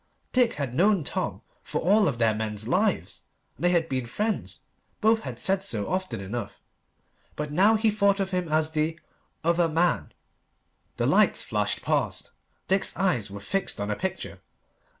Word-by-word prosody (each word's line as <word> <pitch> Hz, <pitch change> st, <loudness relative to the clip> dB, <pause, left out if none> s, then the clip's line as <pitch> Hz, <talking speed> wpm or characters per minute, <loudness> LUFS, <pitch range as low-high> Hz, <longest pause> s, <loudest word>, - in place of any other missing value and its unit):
Dick 250 Hz, -2 st, +3 dB
had 140 Hz, -5 st, -4 dB
known 190 Hz, +3 st, +3 dB
Tom -, -, -3 dB, 0.2 s
for -, -, -3 dB
all 205 Hz, +4 st, +4 dB
of 135 Hz, -6 st, -1 dB
their 115 Hz, -2 st, +3 dB
men's 110 Hz, 0 st, -4 dB
lives, -, -, 0 dB, 0.3 s
and 140 Hz, -, -11 dB
they 175 Hz, -, +5 dB
had 170 Hz, -2 st, +2 dB
been 130 Hz, -4 st, -2 dB
friends. 215 Hz, -, -2 dB, 0.4 s
Both 220 Hz, +1 st, +4 dB
had -, -, -7 dB
said 195 Hz, 0 st, +1 dB
so 110 Hz, -, -2 dB
often 185 Hz, -, -2 dB
enough. 105 Hz, +5 st, -5 dB, 0.8 s
But 150 Hz, 0 st, -4 dB
now 200 Hz, +8 st, +5 dB
he 220 Hz, 0 st, +2 dB
thought 200 Hz, -1 st, +2 dB
of 195 Hz, -1 st, -1 dB
him 180 Hz, -3 st, -1 dB
as 155 Hz, 0 st, +1 dB
the 160 Hz, +1 st, -1 dB, 0.4 s
"other 170 Hz, 0 st, +3 dB
man." 170 Hz, +3 st, +1 dB, 0.9 s
The -, -, +1 dB
lights -, -, +3 dB
flashed -, -, -1 dB
past. -, -, -1 dB, 0.4 s
Dick's 195 Hz, +1 st, 0 dB
eyes 165 Hz, -, +1 dB
were 100 Hz, +1 st, -7 dB
fixed 180 Hz, -, -2 dB
on 100 Hz, +1 st, -2 dB
a -, -, 0 dB
picture. 190 Hz, -, -4 dB
170 Hz, 170 wpm, -26 LUFS, 125-195 Hz, 0.9 s, they